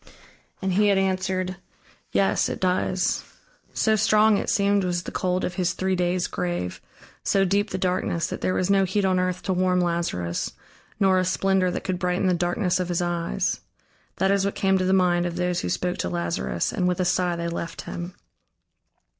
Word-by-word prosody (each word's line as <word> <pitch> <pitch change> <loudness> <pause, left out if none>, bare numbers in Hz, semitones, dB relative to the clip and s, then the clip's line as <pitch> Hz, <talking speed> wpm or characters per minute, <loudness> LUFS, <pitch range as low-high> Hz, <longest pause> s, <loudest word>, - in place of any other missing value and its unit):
And 190 -1 0
he 210 +3 +4
had 200 -1 +4
answered: 185 -1 -1 0.5
"Yes, 195 - +2
it - - -4
does." 185 0 0 0.5
So 220 -1 +2
strong, 215 0 +4
it - - -3
seemed, 200 0 +2
was 175 -1 -1
the - - -6
cold 180 0 0
of 180 - -3
his 180 -1 0
three 190 +1 0
days' 180 0 0
grave, 175 - -3 0.4
so 195 -1 +2
deep 200 +3 +1
the 190 - -3
darkness, 180 -2 0
that - - -5
there 185 - 0
was 185 - +1
no 195 -1 +4
heat 195 +2 0
on 185 -1 +2
earth 185 0 -1
to 190 - 0
warm 185 0 +2
Lazarus, 170 - -1 0.5
nor 190 -2 +4
a - - +2
splendor 185 0 +1
that 180 - -4
could 185 -2 -2
brighten 180 +1 0
the 185 - +3
darkness 175 +2 0
of 180 -1 -2
his 175 0 0
eyes. 175 +2 -1 0.6
That 190 +1 +2
is 200 -1 +2
what 200 - -1
came 190 -1 +2
to 185 - 0
the 185 - +2
mind 175 -2 +3
of 170 - -5
those 180 0 0
who - - -3
spoke 180 0 -1
to 85 - -1
Lazarus, 85 -3 -2
and 180 - 0
with 180 0 0
a 185 - +1
sigh 175 0 +1
they 170 0 -3
left 170 0 -4
him. 175 +1 -6
185 Hz, 200 wpm, -24 LUFS, 175-190 Hz, 0.6 s, he